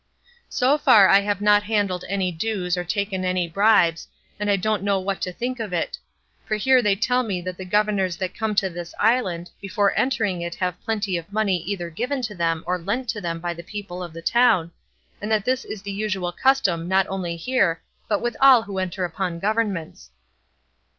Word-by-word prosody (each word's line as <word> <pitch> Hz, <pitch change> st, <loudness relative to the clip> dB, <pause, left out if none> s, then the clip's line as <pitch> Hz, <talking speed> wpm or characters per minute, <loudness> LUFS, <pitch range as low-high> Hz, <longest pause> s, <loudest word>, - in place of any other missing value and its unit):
So 275 Hz, +4 st, +2 dB
far 225 Hz, -10 st, +7 dB
I 195 Hz, -, +6 dB
have 200 Hz, 0 st, -2 dB
not 205 Hz, 0 st, +5 dB
handled 205 Hz, -4 st, -1 dB
any 190 Hz, -2 st, 0 dB
dues 180 Hz, 0 st, -2 dB
or 180 Hz, -, -2 dB
taken 195 Hz, +1 st, -2 dB
any 185 Hz, -1 st, 0 dB
bribes, 175 Hz, -2 st, +3 dB, 0.3 s
and 210 Hz, 0 st, -1 dB
I 200 Hz, -, +4 dB
don't 210 Hz, +1 st, 0 dB
know 200 Hz, -1 st, +1 dB
what 190 Hz, +1 st, -3 dB
to 180 Hz, -, -2 dB
think 245 Hz, +6 st, -4 dB
of 215 Hz, -5 st, -4 dB
it; 170 Hz, -, -1 dB, 0.5 s
for 215 Hz, -, -2 dB
here 255 Hz, +4 st, +4 dB
they 205 Hz, -4 st, +2 dB
tell 250 Hz, +5 st, +1 dB
me 200 Hz, -7 st, -2 dB
that 185 Hz, +1 st, -5 dB
the 185 Hz, -, -8 dB
governors 195 Hz, -2 st, +1 dB
that 185 Hz, 0 st, -3 dB
come 220 Hz, -2 st, -2 dB
to 195 Hz, -1 st, +2 dB
this 175 Hz, -1 st, -8 dB
island, 195 Hz, -7 st, +1 dB
before 200 Hz, +1 st, +1 dB
entering 210 Hz, -9 st, 0 dB
it 170 Hz, 0 st, -4 dB
have 180 Hz, -1 st, -3 dB
plenty 205 Hz, -5 st, -1 dB
of 170 Hz, +3 st, -9 dB
money 205 Hz, -3 st, +1 dB
either 175 Hz, -3 st, -4 dB
given 250 Hz, -, -3 dB
to 220 Hz, -3 st, -3 dB
them 165 Hz, -3 st, -1 dB
or 180 Hz, 0 st, -1 dB
lent 230 Hz, +8 st, -3 dB
to 215 Hz, -3 st, -2 dB
them 165 Hz, -2 st, -3 dB
by 175 Hz, 0 st, -3 dB
the 170 Hz, -, -9 dB
people 185 Hz, 0 st, -7 dB
of 175 Hz, -2 st, -6 dB
the 165 Hz, +1 st, -10 dB
town, 225 Hz, -7 st, +3 dB, 0.5 s
and 210 Hz, +2 st, -4 dB
that 215 Hz, -2 st, +1 dB
this 260 Hz, +1 st, 0 dB
is 205 Hz, -2 st, -8 dB
the 200 Hz, -, -5 dB
usual 195 Hz, -3 st, -2 dB
custom 185 Hz, -8 st, +1 dB
not 190 Hz, +1 st, +3 dB
only 180 Hz, -3 st, -3 dB
here 170 Hz, -4 st, +1 dB, 0.3 s
but 210 Hz, 0 st, 0 dB
with 240 Hz, -1 st, -1 dB
all 265 Hz, -4 st, +7 dB
who 200 Hz, -3 st, -5 dB
enter 185 Hz, 0 st, -2 dB
upon 175 Hz, 0 st, -3 dB
governments. 195 Hz, -, -2 dB
195 Hz, 205 wpm, -23 LUFS, 180-215 Hz, 0.5 s, far